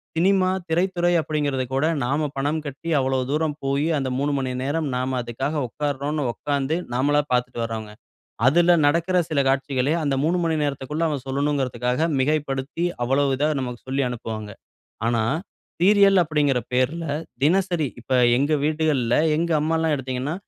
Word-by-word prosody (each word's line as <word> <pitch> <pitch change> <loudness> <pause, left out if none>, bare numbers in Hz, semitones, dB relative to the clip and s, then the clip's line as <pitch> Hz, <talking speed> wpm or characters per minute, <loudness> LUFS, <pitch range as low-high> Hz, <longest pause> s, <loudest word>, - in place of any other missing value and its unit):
Cinema 185 +2 +3 0.2
திரைத்துறை 175 +1 +1
அப்பிடிங்கிறது 145 -3 -1
கூட 135 +3 +1 0.2
நாம 145 +5 0
பணம் 145 +3 0
கட்டி 145 +4 -6
அவ்ளோ 130 0 0
தூரம் 150 0 0
போயி, 140 +2 0
அந்த 135 -2 -2
3:00 140 +2 0
மணி 130 -1 -2
நேரம் 145 +3 -1
நாம 130 +1 -1
அதுக்காக 135 +6 -3
உட்காருறோன்னு 145 +4 -2
உக்கார்ந்து 145 +2 -1 0.2
நாமளா 145 +4 +2
பார்த்துட்டு 125 -1 0
வர்றோங்க. 110 -2 -5 0.6
அதில 175 +5 +5
நடக்குற 170 +5 +2
சில 155 -3 +1
காட்சிகளே 135 0 +1
அந்த 140 -2 +1
3:00 170 +4 +2
மணி 165 -1 +1
நேரத்துக்குள்ள 145 +2 -2
அவன் 145 -5 -3
சொல்லணுன்றதுக்காக 135 0 0
மிகைப்படுத்தி 145 +2 -1 0.2
அவ்ளோ 135 +4 +2
இதா 145 +3 +1
நமக்கு 125 -2 -4
சொல்லி 135 +1 0
அனுப்புவாங்க. 110 -3 -5 0.6
ஆனா 115 -1 +1 0.6
சீரியல் 195 0 +5
அப்பிடிங்கிற 150 -5 +1
பேர்ல, 130 +7 0 0.4
தினசரி 175 0 +2
இப்ப 130 - -6 0.3
எங்க 145 +3 +1
வீடுகள்ல 150 -6 +1 0.2
எங்க 170 +2 -1
அம்மால்லாம் 160 0 +1
எடுத்தீங்கன்னா, 130 +2 -3
145 Hz, 140 wpm, -23 LUFS, 130-160 Hz, 0.6 s, அதில